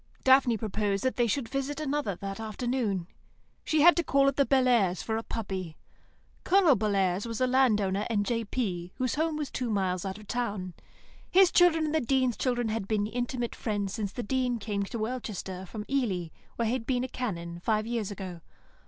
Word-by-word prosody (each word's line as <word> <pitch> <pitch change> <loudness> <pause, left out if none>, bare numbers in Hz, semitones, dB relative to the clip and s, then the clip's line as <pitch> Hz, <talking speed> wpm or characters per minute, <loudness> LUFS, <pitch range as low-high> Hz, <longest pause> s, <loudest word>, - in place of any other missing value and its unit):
Daphne 260 -3 +5
proposed 205 -2 -1
that 260 - 0
they 240 -1 +2
should 240 +1 -1
visit 275 +3 -3
another 290 -9 -1
that 195 +2 -6
afternoon. 220 -3 -2 0.6
She 310 -1 +2
had 345 +3 +8
to 340 - +2
call 275 -2 +3
at 275 - +2
the 280 -1 +2
Bellairs' 240 -9 +3
for 220 - -2
a 225 - -1
puppy. 190 -8 -5 0.7
Colonel 360 -6 +5
Bellairs 200 -2 0
was 230 -1 -4
a 255 - +3
land 255 -4 +3
owner 195 +1 -1
and 205 -3 +1
J.P., 205 -6 -2
whose 255 -2 -1
home 315 0 0
was 295 -3 -4
two 250 -2 -2
miles 185 -4 0
out 190 0 -4
of 215 - -12
the - - -5
town. 205 -7 -2 0.6
His 375 -1 +6
children 330 -3 +5
and 305 - -2
the 315 - +2
Dean's 255 -1 +1
children 245 -3 0
had 215 -3 -2
been 210 -1 +1
intimate 240 +1 -3
friends 205 -3 -2
since 210 -4 -3
the 240 - -5
Dean 250 +1 0
came 205 -2 -3
to 200 +4 -4
Welchester 215 -5 -4
from 210 +1 -6
Ely, 205 -12 -1 0.3
where 235 - -1
he 225 - +1
had 250 -2 -3
been 250 -2 +1
a - - -2
Canon, 170 -10 -4
five 215 +3 0
years 230 -3 -2
ago. 185 -4 -7
225 Hz, 200 wpm, -29 LUFS, 200-260 Hz, 0.7 s, had